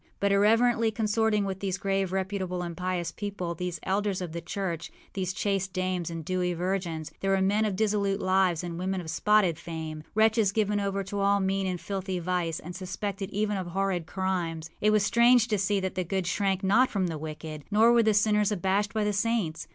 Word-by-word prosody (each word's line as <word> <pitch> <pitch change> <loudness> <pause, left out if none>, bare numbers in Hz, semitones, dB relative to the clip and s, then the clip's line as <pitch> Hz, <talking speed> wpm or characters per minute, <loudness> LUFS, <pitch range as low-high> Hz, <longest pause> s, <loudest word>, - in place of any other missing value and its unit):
But, 200 0 +2
irreverently 225 +3 +4
consorting 220 -1 +1
with 190 -1 -4
these 195 -1 -2
grave, 195 -1 -1
reputable, 190 -1 -2
and 170 -1 -5
pious 180 -1 -2
people, 200 -4 -4
these 175 0 -4
elders 200 0 0
of 180 -3 -5
the 170 +1 -5
church, 170 -2 -4 0.2
these 185 -2 -2
chaste 195 -1 -1
dames 185 -2 -1
and 165 -2 -6
dewy 180 0 0
virgins, 175 -3 -2
there 195 - -1
were 195 0 +3
men 205 +3 +2
of 205 -3 -1
dissolute 200 -1 +1
lives 185 -3 +2
and 170 -1 -5
women 190 +1 -1
of 160 -3 -5
spotted 190 -2 +3
fame, 160 -2 -6
wretches 220 -2 +4
given 210 -1 +1
over 200 0 -1
to 200 +1 -4
all 200 0 +3
mean 195 0 0
and 180 -1 -2
filthy 190 -1 -3
vice, 175 -2 -1
and 175 +2 -8
suspected 195 +1 -4
even 210 0 -1
of 185 -2 -4
horrid 185 -2 -1
crimes. 170 -4 -2
It 210 - +4
was 215 -1 +3
strange 235 +1 +5
to 210 -2 +1
see 200 +1 +1
that 190 0 -2
the 185 - -1
good 190 +1 -2
shrank 190 +2 0
not 225 +7 +4
from 195 -3 0
the 165 -3 -3
wicked, 155 -1 -7
nor 220 +3 +5
were 235 - +5
the 220 -2 +3
sinners 210 0 +3
abashed 200 +2 0
by 215 - +1
the 210 0 0
saints. 200 -6 -1
195 Hz, 205 wpm, -28 LUFS, 180-205 Hz, 0.2 s, strange